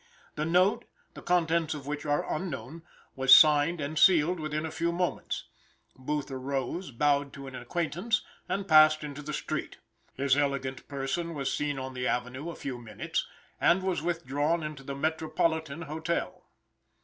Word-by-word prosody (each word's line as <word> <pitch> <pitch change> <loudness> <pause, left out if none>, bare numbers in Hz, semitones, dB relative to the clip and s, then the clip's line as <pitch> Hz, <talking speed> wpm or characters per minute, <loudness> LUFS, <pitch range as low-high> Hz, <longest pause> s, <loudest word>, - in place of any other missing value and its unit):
The 155 - -2
note, 180 +4 +3 0.3
the - - -10
contents 165 -2 +1
of 140 -2 -8
which 150 +1 -4
are 145 0 +1
unknown, 165 -1 -5 0.3
was 130 0 +8
signed 155 +2 +5
and 150 +2 -2
sealed 175 -1 +5
within 155 0 -2
a 160 - -4
few 170 +1 -1
moments. 180 +1 -2 0.5
Booth 145 +2 -3
arose, 135 +6 -3
bowed 140 +2 +1
to 140 - -9
an 135 - -9
acquaintance, 175 - -1 0.3
and 195 0 -2
passed 155 -2 +6
into 145 0 -6
the 150 +1 -6
street. - - -4 0.4
His 135 0 +2
elegant 140 -2 -1
person 145 +5 -3
was 135 -2 -2
seen 145 -1 -1
on 130 0 -5
the 125 0 -2
avenue 125 +6 -2
a 170 - -6
few 130 -3 -5
minutes, 110 -3 -3 0.3
and 180 +2 +3
was 185 -5 0
withdrawn 165 -1 -1
into 150 -2 -6
the 140 0 -6
Metropolitan 160 +1 -1
Hotel. 160 +2 -3
150 Hz, 160 wpm, -29 LUFS, 140-165 Hz, 0.5 s, was